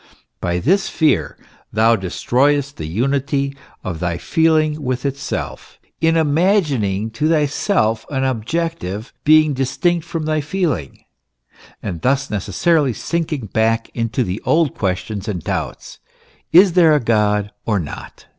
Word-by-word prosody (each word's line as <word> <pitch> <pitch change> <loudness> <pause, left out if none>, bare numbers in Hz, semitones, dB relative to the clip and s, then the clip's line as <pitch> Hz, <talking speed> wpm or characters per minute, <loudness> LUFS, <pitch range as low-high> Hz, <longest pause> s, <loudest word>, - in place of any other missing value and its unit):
By 85 0 -1
this 175 - +1
fear 155 -2 +1 0.3
thou 110 +2 +4
destroyest 135 +9 0
the 80 - -5
unity 140 - -1 0.3
of 85 -4 -4
thy 90 -1 -1
feeling 155 - +1
with 130 -1 -2
itself, 140 0 -4 0.2
in 165 0 +3
imagining 145 - +1
to 150 +7 0
thyself 145 - +1
an 135 -2 -1
objective 130 - -3
being 155 -1 +5
distinct 160 +6 0
from 165 -1 -4
thy 155 0 0
feeling, 145 - -2 0.8
and 90 -6 -4
thus 135 +1 +1
necessarily 140 - +1
sinking 155 -3 -3
back 115 +1 +1
into 115 +1 -1
the 95 0 -4
old 155 -3 +2
questions 95 +2 -3
and 90 -6 -3
doubts - - -4 0.5
is 180 +1 +7
there 165 -4 +5
a - - +3
God 105 -3 +1 0.2
or 105 -3 +2
not? 80 - -8
135 Hz, 130 wpm, -19 LUFS, 110-155 Hz, 0.8 s, is